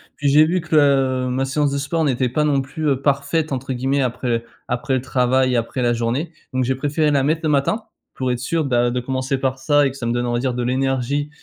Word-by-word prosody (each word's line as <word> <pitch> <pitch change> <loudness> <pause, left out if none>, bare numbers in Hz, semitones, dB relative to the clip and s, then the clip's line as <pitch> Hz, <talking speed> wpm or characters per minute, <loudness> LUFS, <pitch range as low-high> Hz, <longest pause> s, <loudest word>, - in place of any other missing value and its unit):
Puis 145 - -2
j'ai 150 +2 +6
vu 180 +3 0
que 160 -1 -2
le 135 -3 +3
ma 130 +2 0
séance 145 +2 0
de 140 - -1
sport 150 +4 -1
n'était 130 -3 +1
pas 150 +5 0
non 140 -2 +2
plus, 150 +4 -4
heu, 135 -1 0
«parfaite» 140 +2 0
entre 130 0 -3
guillemets, 135 +3 0
après 120 -2 -1 0.2
après 130 +2 -1
le 125 - 0
travail, 130 0 +1
après 120 +3 -1
la 120 0 +2
journée. 120 +8 -2 0.2
Donc, 130 0 +1
j'ai 130 +2 +1
préféré 145 +3 0
la 140 -1 +3
mettre 155 +3 +1
le 155 - +1
matin, 150 +10 +1 0.3
pour 130 -1 -1
être 120 - -2
sûr, 160 +5 -1
bah, 120 -2 +2
de 125 - -1
commencer 130 +1 -2
par 130 0 -2
ça 145 +1 +3
et 135 - 0
que 135 - -11
ça 120 - -5
me - - 0
donne, 120 0 -1
on 120 - -1
va 120 - +1
dire, 130 -1 -1
de 125 - -2
l'énergie 135 +3 -1
135 Hz, 255 wpm, -20 LUFS, 125-145 Hz, 0.3 s, j'ai